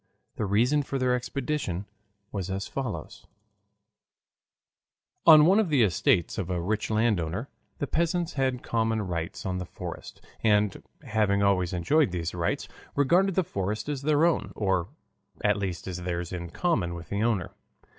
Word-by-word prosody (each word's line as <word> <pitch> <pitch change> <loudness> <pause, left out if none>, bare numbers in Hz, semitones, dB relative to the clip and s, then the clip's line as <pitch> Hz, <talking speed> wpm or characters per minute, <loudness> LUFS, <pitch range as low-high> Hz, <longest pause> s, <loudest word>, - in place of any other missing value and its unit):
The 105 - -2
reason 120 +9 +3
for 140 -1 -3
their 130 -1 +2
expedition 125 - -2 0.5
was 100 -2 -3
as 95 +1 -2
follows: 130 -6 -5 2.0
On 155 -2 +10
one 190 +5 +5
of 210 -6 +1
the 140 -6 +4
estates 85 0 +2
of 95 -2 -3
a 90 -1 -1
rich 105 +5 -1
landowner 110 -1 0 0.3
the - - -1
peasants 170 +3 0
had 130 -2 0
common 115 -1 0
rights 85 -3 -4
on 90 -1 -1
the 90 - -4
forest, - - -8 0.2
and 105 -2 +2 0.2
having 105 -2 +1
always 90 -3 +2
enjoyed 95 - +2
these 85 -2 -3
rights, 85 -1 -1 0.3
regarded 175 +7 +3
the 190 - +3
forest 100 - -3
as 145 -3 -3
their 150 +2 +3
own, 170 - +1
or 95 -4 0 0.6
at 105 -1 +3
least 95 -4 -4
as 90 -2 -4
theirs 85 0 -3
in 85 -1 -5
common 90 - 0
with 85 -2 -9
the 100 +1 -1
owner. 110 -6 0
105 Hz, 155 wpm, -27 LUFS, 90-140 Hz, 2.0 s, On